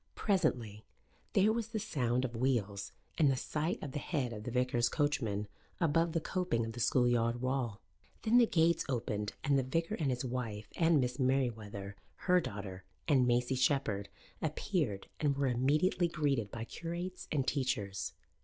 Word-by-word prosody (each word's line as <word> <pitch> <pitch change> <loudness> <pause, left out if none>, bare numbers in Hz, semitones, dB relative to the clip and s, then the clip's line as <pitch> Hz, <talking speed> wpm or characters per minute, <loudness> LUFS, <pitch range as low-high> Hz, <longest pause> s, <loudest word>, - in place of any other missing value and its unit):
Presently 125 - 0 0.5
there 205 +3 +4
was 230 -1 -2
the 225 - -4
sound 130 - 0
of 120 -2 -5
wheels 105 -6 0 0.3
and 150 -3 +6
the 135 - +3
sight 155 +6 -1
of 145 - -4
the 145 - -3
head 135 -7 -2
of 105 0 -7
the - - -2
vicar's 125 -1 +2
coachman 115 -9 0 0.3
above 165 0 +2
the 165 - +2
coping 170 -9 -1
of 115 - -4
the 120 - -7
schoolyard 120 0 +2
wall. 130 -4 -1 0.4
Then 235 +3 +5
the 235 - +6
gates 170 -2 +3
opened 115 -5 -2
and 140 -1 +3
the - - +1
vicar 165 +9 -1
and 155 -9 0
his 125 0 -1
wife 115 -5 -4
and 165 -2 +4
Miss 125 0 -1
Merewether, 110 -7 0 0.2
her 180 -1 +3
daughter, 100 - -6 0.2
and 130 -5 +4
Maisie 125 +1 +2
Shepherd 125 -7 +1 0.3
appeared 155 - -1
and 145 -3 +1
were 140 - +1
immediately 145 +8 +2
greeted 145 -10 0
by 115 +2 -5
curates 170 +6 -5
and 140 -4 0
teachers. 125 -8 -1
130 Hz, 165 wpm, -33 LUFS, 115-160 Hz, 0.5 s, and